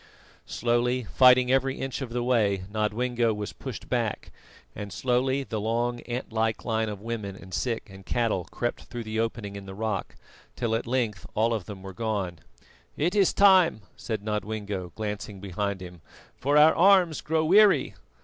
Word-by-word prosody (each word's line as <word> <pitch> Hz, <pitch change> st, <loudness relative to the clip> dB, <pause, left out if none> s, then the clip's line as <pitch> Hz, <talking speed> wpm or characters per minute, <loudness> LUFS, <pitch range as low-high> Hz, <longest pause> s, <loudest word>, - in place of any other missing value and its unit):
Slowly, 120 Hz, +2 st, 0 dB
fighting, 125 Hz, +2 st, +5 dB
every 135 Hz, 0 st, +2 dB
inch 135 Hz, +1 st, -4 dB
of 130 Hz, -, -4 dB
the 120 Hz, +1 st, -2 dB
way, 105 Hz, -6 st, +2 dB
Nodwengo 115 Hz, +2 st, 0 dB
was 105 Hz, -1 st, -5 dB
pushed -, -, -8 dB
back, -, -, -2 dB, 0.4 s
and 100 Hz, -1 st, -6 dB
slowly 130 Hz, +7 st, 0 dB
the 110 Hz, -4 st, -4 dB
long 120 Hz, +2 st, -1 dB
ant 120 Hz, -1 st, -4 dB
like 110 Hz, 0 st, 0 dB
line 110 Hz, -1 st, 0 dB
of 100 Hz, -2 st, -6 dB
women 105 Hz, -4 st, -4 dB
and 95 Hz, -1 st, -12 dB
sick 115 Hz, +1 st, -2 dB
and 95 Hz, -1 st, -13 dB
cattle 110 Hz, -5 st, 0 dB
crept 120 Hz, +6 st, -4 dB
through 120 Hz, -1 st, -6 dB
the 110 Hz, 0 st, -3 dB
opening 115 Hz, -3 st, -3 dB
in 100 Hz, -1 st, -8 dB
the 95 Hz, -, -8 dB
rock, 110 Hz, -2 st, -3 dB, 0.4 s
till 115 Hz, -2 st, -1 dB
at 115 Hz, +1 st, -1 dB
length 110 Hz, -8 st, -1 dB
all 115 Hz, +2 st, +2 dB
of 105 Hz, -6 st, -3 dB
them 95 Hz, -3 st, -9 dB
were 95 Hz, -1 st, -8 dB
gone. 100 Hz, -6 st, -3 dB, 0.6 s
"It 170 Hz, +5 st, +1 dB
is 200 Hz, -3 st, +4 dB
time," 190 Hz, -, +5 dB
said 110 Hz, -3 st, -4 dB
Nodwengo, 105 Hz, -3 st, -3 dB
glancing 105 Hz, -2 st, -5 dB
behind 100 Hz, 0 st, -3 dB
him, 90 Hz, -2 st, -11 dB, 0.3 s
"for 145 Hz, +3 st, +1 dB
our 155 Hz, +2 st, +7 dB
arms 180 Hz, -3 st, +5 dB
grow 160 Hz, 0 st, 0 dB
weary." 190 Hz, -4 st, +5 dB
115 Hz, 170 wpm, -27 LUFS, 105-125 Hz, 0.6 s, our